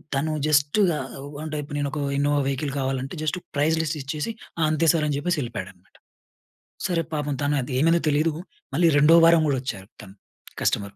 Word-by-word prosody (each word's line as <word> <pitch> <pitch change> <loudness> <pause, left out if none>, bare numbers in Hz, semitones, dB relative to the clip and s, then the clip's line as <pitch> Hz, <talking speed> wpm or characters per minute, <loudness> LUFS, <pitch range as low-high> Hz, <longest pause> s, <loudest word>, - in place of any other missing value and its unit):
తను 150 +3 0 0.2
జస్ట్‌గా 155 +4 +3 0.3
ఓహ్, 145 +1 -9
అంటే, 155 -1 -4
ఇప్పుడు 145 0 -6
నేనొక 145 +1 -2 0.2
ఇన్నోవా 145 +1 +2
వెహికల్ 140 +1 -2
కావాలంటే, 135 0 -2
జస్ట్ 155 +3 -1 0.2
ప్రైస్ 155 +3 +2
లిస్ట్ 155 -1 -2
ఇచ్చేసి, 150 +9 -3 0.3
"ఆ! - - 0
అంతే 155 +1 +1
సార్" 165 -3 0
అని 145 - 0
జెప్పేసి 170 +2 -1
ఎళిపోయాడనమాట. 120 -2 -8 0.9
సరే, 175 -2 0
పాపం 150 -1 -1
తనది 145 -2 0
ఏమైందో 165 +3 +3
తెలీదు. 150 +3 +2 0.4
మళ్ళీ 170 - +3
రెండో 150 +3 +6
వారం 165 -1 +6
గూడా 140 -2 +1
వచ్చారు 100 -7 -6
తను. 95 -2 -13 0.5
కస్టమరు. 100 -1 -1
145 Hz, 170 wpm, -24 LUFS, 140-160 Hz, 0.9 s, రెండో